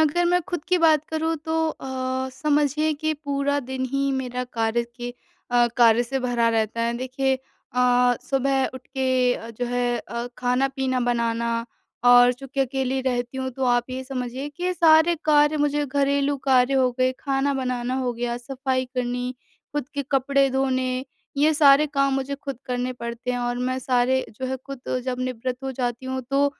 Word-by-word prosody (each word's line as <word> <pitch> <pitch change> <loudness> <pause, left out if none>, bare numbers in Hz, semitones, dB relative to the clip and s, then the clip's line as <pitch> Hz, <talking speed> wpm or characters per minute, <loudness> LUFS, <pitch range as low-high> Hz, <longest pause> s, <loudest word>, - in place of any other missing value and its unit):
अगर 315 +3 +3
मैं 355 +1 +3
ख़ुद 350 -5 -3
की 365 -1 +3
बात 310 -2 +4
करूँ 320 +1 -1
तो 320 0 -1
अ, 260 -2 -3
समझिए 295 +2 +1
कि 310 +1 -1
पूरा 285 -1 -1
दिन 260 0 -4
ही 275 0 +1
मेरा 250 -1 -2
कार्य 230 -1 0
के 245 0 -6 0.4
अ, 240 0 +4
कार्य 235 -1 +5
से 265 +3 -2
भरा 240 -2 +1
रहता 225 0 0
है 235 0 +1
देखिए 260 +2 0
अ, 250 -1 +1
सुबह 270 0 +1
उठ 260 0 -10
के 260 -2 +1
अ, 230 - -8
जो 230 +2 -4
है 245 0 0
अ, 235 +2 -5
ख़ाना-पीना 260 +1 0
बनाना 235 -1 0 0.4
और 245 0 +7
चूँकि 270 +2 -5
अकेली 265 0 0
रहती 245 -1 -2
हूँ 260 0 -2
तो 260 +1 -3
आप 245 0 +1
ये 260 +1 -4
समझिए 260 +1 -4
कि 355 +5 -2
सारे 325 0 +5
कार्य 295 0 +4
मुझे 295 0 +1
घरेलू 280 +1 +1
कार्य 260 -1 +3
हो 260 -2 +3
गए, 255 0 +3
ख़ाना 275 0 0
बनाना 255 -1 -2
हो 250 -2 -1
गया, 235 0 -3
सफ़ाई 260 +1 -2
करनी 250 0 -2 0.4
ख़ुद 290 -3 -3
के 280 - -1
कपड़े 275 0 +3
धोने 260 -1 0 0.3
ये 305 +2 +4
सारे 290 0 +6
काम 275 -1 +1
मुझे 270 +1 -2
ख़ुद 275 -3 -7
करने 250 0 -2
पड़ते 235 0 -5
हैं 245 - -1
और 245 0 -2
मैं 255 +1 -1
सारे 255 0 +1
जो 260 - -2
है 265 - -2
ख़ुद 265 0 -9 0.2
जब 255 -1 -2
निवृत्त 255 +1 -3
हो 265 - -2
जाती 245 0 -3
हूँ 260 0 -2
तो 280 +1 +3
260 Hz, 180 wpm, -24 LUFS, 245-275 Hz, 0.4 s, और